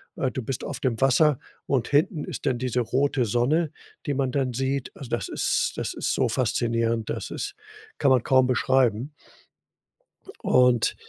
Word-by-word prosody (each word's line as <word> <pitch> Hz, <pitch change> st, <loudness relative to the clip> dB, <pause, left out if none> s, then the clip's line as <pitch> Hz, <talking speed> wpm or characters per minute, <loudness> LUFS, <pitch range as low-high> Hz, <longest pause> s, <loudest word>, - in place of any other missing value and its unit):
äh, 130 Hz, -, 0 dB
du 130 Hz, -4 st, -4 dB
bist 130 Hz, +1 st, -4 dB
auf 135 Hz, -2 st, -5 dB
dem 125 Hz, -6 st, -1 dB
Wasser 135 Hz, +1 st, +4 dB, 0.3 s
und 130 Hz, -4 st, 0 dB
hinten 150 Hz, +2 st, +1 dB
ist -, -, -7 dB
dann 120 Hz, -2 st, +1 dB
diese 125 Hz, -1 st, 0 dB
rote 130 Hz, +2 st, +1 dB
Sonne, 140 Hz, +9 st, +1 dB, 0.3 s
die 145 Hz, -, -1 dB
man 135 Hz, -2 st, 0 dB
dann 130 Hz, -3 st, -1 dB
sieht, 135 Hz, +1 st, -2 dB
also, 135 Hz, -4 st, -9 dB
das 120 Hz, -, -2 dB
ist -, -, 0 dB
das -, -, -3 dB
ist -, -, -1 dB
so -, -, +1 dB
faszinierend, 115 Hz, -1 st, 0 dB
dass -, -, -4 dB
ist -, -, -5 dB, 0.4 s
kann 140 Hz, -2 st, +3 dB
man 130 Hz, -, +4 dB
kaum 130 Hz, -1 st, +4 dB
beschreiben. 130 Hz, +1 st, +1 dB, 1.3 s
Und 125 Hz, -2 st, +3 dB
130 Hz, 170 wpm, -25 LUFS, 120-140 Hz, 1.3 s, Wasser